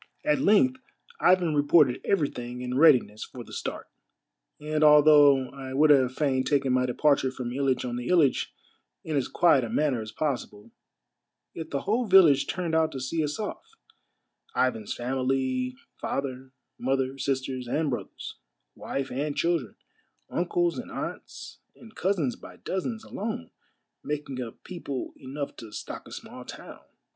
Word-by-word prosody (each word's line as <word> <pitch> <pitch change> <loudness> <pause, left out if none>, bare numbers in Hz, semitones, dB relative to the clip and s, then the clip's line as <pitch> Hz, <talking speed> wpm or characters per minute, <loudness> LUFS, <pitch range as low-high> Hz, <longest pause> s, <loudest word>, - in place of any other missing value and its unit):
At 300 -2 +2
length 255 +3 +3 0.4
Ivan 180 -3 +4
reported 145 -3 +4
everything 125 -9 -1
in 125 0 -3
readiness 130 -8 +4
for 125 - -9
the - - -14
start; - - -5 0.7
and 155 +1 -1
although 145 -3 +6
I 135 -1 -7
would 150 +2 +5
have 130 -3 +4
fain 135 -4 +1
taken 135 -1 +1
my 125 0 +2
departure 140 +1 +2
from 125 -2 -5
Hitch 135 0 0
on 120 -1 -3
the 125 - -5
Hitch 165 -7 +3 0.5
in 155 - -3
as 135 -3 +1
quiet 165 -7 +4
a 115 - -4
manner 140 -4 +1
as 110 0 -7
possible, 120 -7 -4 0.8
yet 160 -1 -7
the 140 - -2
whole 230 +3 0
village 175 -8 +6
turned 175 -3 -3
out 160 0 +2
to 135 - -4
see 155 +5 -1
us 150 0 -2
off 330 - -6 0.4
— 460 - -37
Ivan's 115 -5 0
family, 130 0 -1 0.2
father, 130 -1 -4 0.3
mother, 135 +1 -1
sisters, 130 -2 -2
and 150 +3 0
brothers, 120 - -6 0.4
wife 135 -1 -4
and 145 +2 -2
children, 165 - 0 0.6
uncles 175 +1 0
and 245 - -7
aunts - - -7 0.2
and 225 -2 -15
cousins 175 - 0
by - - -13
dozens 220 +4 -4
alone 205 - -5 0.5
making 145 -3 -4
up 115 -2 -8
people 145 -7 -6
enough 140 +2 -6
to 110 -2 -10
stock - - -7
a - - -13
small - - -9
town. - - -10
140 Hz, 150 wpm, -27 LUFS, 130-160 Hz, 0.8 s, although